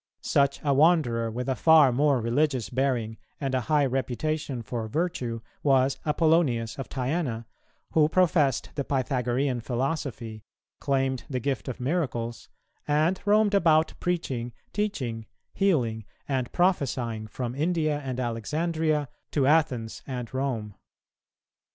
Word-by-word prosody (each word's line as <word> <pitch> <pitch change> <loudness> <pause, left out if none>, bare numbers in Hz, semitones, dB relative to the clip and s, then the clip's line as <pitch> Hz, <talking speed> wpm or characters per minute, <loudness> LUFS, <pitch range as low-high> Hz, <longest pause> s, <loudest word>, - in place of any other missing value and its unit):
Such 140 0 +2
a 145 -2 +2
wanderer, 135 -7 +3
with 125 +3 -4
a 135 - +2
far 160 -4 +6
more 140 +1 +3
religious 125 +1 0
bearing 125 -4 0 0.2
and 135 -2 -2
a 130 - +1
high 145 +4 +2
reputation 135 +1 -2
for 110 +1 -4
virtue, 125 -5 -2 0.2
was 135 -1 +3
Apollonius 150 -8 +2
of 135 - -5
Tyana, 130 -3 -2 0.5
who 155 -1 +4
professed 160 -7 +2
the 140 - -2
Pythagorean 130 -1 0
philosophy, 120 -3 -3 0.4
claimed 135 -2 0
the 130 -3 -1
gift 135 +2 -2
of 130 - -5
miracles, 125 -5 -2 0.4
and 155 +5 +2
roamed 210 0 +4
about 160 -5 +4
preaching, 130 -9 -2 0.2
teaching, 130 - -2 0.3
healing, 125 - +1 0.2
and 130 -3 -1
prophesying 130 - 0
from 120 +2 -4
India 155 0 0
and 130 -3 -4
Alexandria 150 +6 -1 0.2
to 140 -3 +1
Athens 135 -7 +1
and 125 -3 -5
Rome. 125 -6 -2
135 Hz, 125 wpm, -27 LUFS, 120-155 Hz, 0.5 s, far